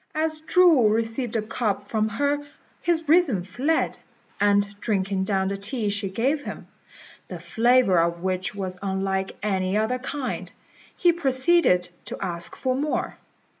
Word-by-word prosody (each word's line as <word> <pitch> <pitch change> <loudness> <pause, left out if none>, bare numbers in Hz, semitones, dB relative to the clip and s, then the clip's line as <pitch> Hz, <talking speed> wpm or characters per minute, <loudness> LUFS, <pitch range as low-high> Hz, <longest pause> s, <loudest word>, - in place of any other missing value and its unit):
As 310 0 -1
Chu 320 -8 +5
received 225 +2 -1
the 220 - 0
cup 215 -3 -2
from 215 +1 -1
her 285 +6 0 0.4
his 330 -2 0
reason 290 - +3
fled; 270 - -1 0.4
and 205 0 +3
drinking 195 -3 -1
down 190 -1 0
the 200 - -3
tea 210 +2 -2
she 200 -1 -1
gave 265 +10 0
him, - - -7 0.6
the 180 - -6
flavour 220 +2 +3
of 170 +1 0
which 185 +1 -1
was 185 -2 -4
unlike 190 0 -2
any 190 -1 0
other 225 +4 0
kind, 265 +1 -4 0.5
he 350 -1 +4
proceeded 270 - +2 0.2
to - - -6
ask 170 -3 -3
for 255 - -1
more. 290 +3 -2
215 Hz, 145 wpm, -24 LUFS, 190-270 Hz, 0.6 s, Chu